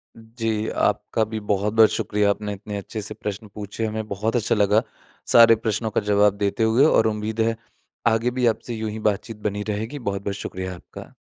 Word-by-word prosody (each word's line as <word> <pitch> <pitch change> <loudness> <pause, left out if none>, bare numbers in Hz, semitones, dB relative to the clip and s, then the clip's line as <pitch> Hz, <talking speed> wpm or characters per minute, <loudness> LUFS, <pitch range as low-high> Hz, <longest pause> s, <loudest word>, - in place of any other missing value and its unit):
जी, 115 -1 -3
आपका 110 - 0
भी 110 0 -4
बहुत-बहुत 105 +2 +3
शुक्रिया 105 -1 +1
आपने 105 0 -2
इतने 100 +1 -6
अच्छे 105 +2 -6
से 110 - -6
प्रश्न 105 +1 -6
पूछे। 105 +2 -4
हमें 110 0 -3
बहुत 105 +4 -2
अच्छा 115 -1 +1
लगा 105 +1 +3 0.5
सारे 115 -1 +8
प्रश्नों 110 0 -2
का - - +1
जवाब 105 0 +3
देते 100 +2 0
हुए 115 +6 +4
और 110 -7 +4
उम्मीद 110 +1 -2
है 115 0 +1 0.5
आगे 115 +2 +2
भी 125 -1 0
आपसे 115 +1 -1
यूँ 110 -1 -3
ही 110 - -6
बातचीत 105 +2 -5
बनी 105 +1 -4
रहेगी 110 +7 -3
बहुत-बहुत 100 -2 -3
शुक्रिया 95 -2 -5
आपका। 85 - -12
110 Hz, 185 wpm, -23 LUFS, 105-115 Hz, 0.5 s, सारे